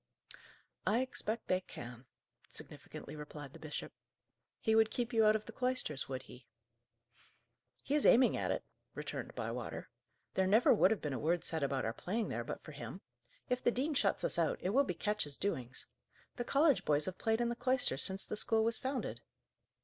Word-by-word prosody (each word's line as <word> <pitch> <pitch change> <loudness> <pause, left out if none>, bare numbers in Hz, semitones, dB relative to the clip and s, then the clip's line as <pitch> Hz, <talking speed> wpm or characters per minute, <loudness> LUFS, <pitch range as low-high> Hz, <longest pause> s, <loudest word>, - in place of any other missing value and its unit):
"I 230 +4 +3
expect 235 -3 -3
they 185 0 +2
can," 120 -6 -10 0.4
significantly 150 - -9
replied 150 -2 -8
the - - -11
bishop. 155 -1 -6 0.7
"He 220 - +1
would 220 0 +5
keep 240 +1 -2
you 225 -1 +5
out 215 0 +6
of 215 - -2
the - - -8
cloisters, 250 - 0
would 130 -1 -4
he?" 125 -1 -14 1.4
"He 280 - -2
is 295 - +4
aiming 250 +1 +6
at - - -1
it," - - -1 0.3
returned - - -5
Bywater. - - -4 0.4
"There 190 0 +2
never 215 +5 +6
would 200 - +5
have 220 -2 0
been 150 -2 -1
a 130 - -2
word 165 +3 +1
said 160 -1 -1
about 135 -1 0
our 115 - -1
playing 210 - -2
there, - - -2
but - - -6
for - - -9
him. - - -7 0.5
If 250 -1 -1
the - - +5
dean 270 +6 0
shuts 205 -7 +1
us - - +1
out, 165 -2 +2
it 185 - -1
will 275 +5 +4
be 180 - -2
Ketch's 210 -8 -2
doings. 130 -11 -3 0.5
The 240 - -2
college 285 +2 +4
boys 150 0 +2
have 185 - -5
played 225 0 +1
in 240 0 +1
the 240 - -2
cloisters 245 - +2
since 190 0 +2
the - - -4
school 220 +1 +5
was 230 0 +1
founded." 265 0 -3
210 Hz, 195 wpm, -35 LUFS, 150-240 Hz, 1.4 s, out